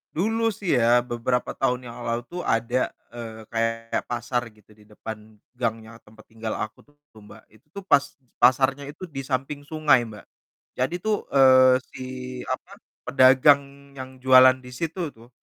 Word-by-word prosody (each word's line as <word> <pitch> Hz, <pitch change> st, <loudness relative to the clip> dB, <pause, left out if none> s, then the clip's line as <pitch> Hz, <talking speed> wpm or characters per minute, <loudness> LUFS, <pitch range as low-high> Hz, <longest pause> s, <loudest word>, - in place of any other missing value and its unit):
Dulu 225 Hz, +7 st, 0 dB
sih 195 Hz, -3 st, -5 dB
ya, 120 Hz, +1 st, +3 dB
beberapa 125 Hz, +1 st, -2 dB
tahun 125 Hz, -1 st, -1 dB
yang 120 Hz, -, -9 dB
lalu 115 Hz, +1 st, -1 dB
tuh 180 Hz, -, -4 dB
ada, 120 Hz, -1 st, 0 dB, 0.2 s
eee, 110 Hz, -2 st, -8 dB
kayak 115 Hz, 0 st, -1 dB
pasar, 120 Hz, +1 st, -2 dB
gitu, 105 Hz, -1 st, -23 dB
di 105 Hz, -, -23 dB
depan 110 Hz, 0 st, -10 dB, 0.2 s
gangnya 115 Hz, -1 st, -4 dB
tempat 110 Hz, 0 st, -19 dB
tinggal 110 Hz, 0 st, -6 dB
aku 110 Hz, -, -6 dB
tuh, 145 Hz, 0 st, -29 dB, 0.2 s
Mbak, 105 Hz, -2 st, -15 dB
itu 110 Hz, +7 st, -23 dB
tuh 200 Hz, +5 st, -9 dB
pas 145 Hz, -7 st, +5 dB, 0.4 s
pasarnya 130 Hz, +3 st, +4 dB
itu 150 Hz, +6 st, -9 dB
di 140 Hz, -6 st, -7 dB
samping 135 Hz, +2 st, -3 dB
sungai, 150 Hz, -3 st, +2 dB
Mbak. 105 Hz, -2 st, -12 dB, 0.5 s
Jadi 130 Hz, +7 st, 0 dB
tuh, 210 Hz, +3 st, -2 dB
eee, 130 Hz, -1 st, +6 dB, 0.2 s
si, -, -, -9 dB, 0.5 s
apa, 175 Hz, +9 st, -5 dB, 0.3 s
pedagang 140 Hz, +1 st, +3 dB
yang 130 Hz, -1 st, -9 dB
jualan 130 Hz, 0 st, +7 dB
di 125 Hz, -, -10 dB
situ 165 Hz, +1 st, -4 dB
itu, 115 Hz, +2 st, -18 dB
130 Hz, 160 wpm, -24 LUFS, 115-140 Hz, 0.5 s, jualan